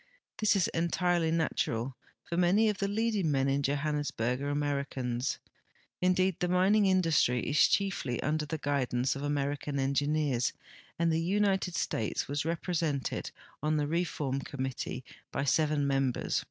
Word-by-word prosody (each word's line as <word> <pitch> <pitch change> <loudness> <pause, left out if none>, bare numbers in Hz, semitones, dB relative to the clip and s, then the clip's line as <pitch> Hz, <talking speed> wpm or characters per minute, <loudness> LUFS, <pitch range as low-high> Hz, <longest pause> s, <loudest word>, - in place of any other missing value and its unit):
This 215 -1 +3
is 190 -3 +3
entirely 170 0 +1
natural, 135 -6 -1 0.3
for 170 - -5
many 185 +5 +4
of 205 -2 -2
the 200 - 0
leading 210 -4 0
men 135 -2 +2
in 140 +1 +1
Johannesburg 140 -3 -1
are 140 - -2
Americans; 140 -4 -1 0.6
indeed, 185 0 +2
the 180 - +1
mining 195 +3 +4
industry 165 -10 +3
is 145 - 0
chieily 185 -11 0
under 150 +1 0
the 160 - -3
guidance 135 -3 0
of 135 - -5
American 145 0 -2
engineers, 140 -1 +1 0.4
and 170 0 +2
the 160 +1 +1
United 190 0 +1
States 110 - -1
was 145 +1 -2
represented 165 -4 -1 0.3
on 155 +1 +1
the 150 - +1
reform 150 -4 -1
committee 130 -2 -4 0.3
by 135 - -1
seven 150 0 +2
mem 135 -2 +2
bers. - - -1
150 Hz, 145 wpm, -30 LUFS, 140-175 Hz, 0.6 s, many